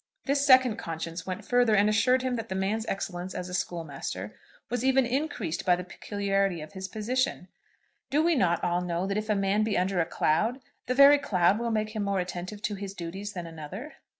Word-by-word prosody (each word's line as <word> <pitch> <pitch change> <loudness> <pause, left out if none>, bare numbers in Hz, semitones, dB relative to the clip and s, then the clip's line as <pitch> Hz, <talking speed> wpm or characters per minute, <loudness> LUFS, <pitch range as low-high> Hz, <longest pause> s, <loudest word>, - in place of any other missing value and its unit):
This 280 0 +1
second 255 -5 +6
conscience 165 -1 -5
went 185 -1 -4
further, 245 -3 +3
and 205 +1 +4
assured 250 +4 +3
him 255 -1 0
that 225 -1 -5
the 190 - -3
man's 210 +4 -1
excellence 185 -1 -4
as 180 - -4
a - - -7
schoolmaster 145 - -4 0.3
was 245 +1 -2
even 265 0 +4
increased 255 - -2
by 180 - +4
the 180 - -5
peculiarity 195 0 -1
of 155 - -10
his 190 -1 -5
position. 220 -1 -2 0.6
Do 300 +3 +2
we 340 +1 +3
not 175 - +2
all 175 0 +1
know 175 0 -2
that 195 0 -2
if 215 +1 -7
a 210 - +3
man 195 +1 +1
be 215 -1 0
under 185 0 +1
a 165 - +1
cloud 215 - +1 0.3
the 255 - 0
very 280 +2 +8
cloud 190 -4 +2
will 235 0 -1
make 215 -1 0
him 215 -1 -3
more 200 -1 0
attentive 180 +3 -5
to 210 - -1
his 200 -1 -6
duties 190 +4 -6
than 175 -2 -5
another? 165 - -8
200 Hz, 210 wpm, -28 LUFS, 180-235 Hz, 0.6 s, very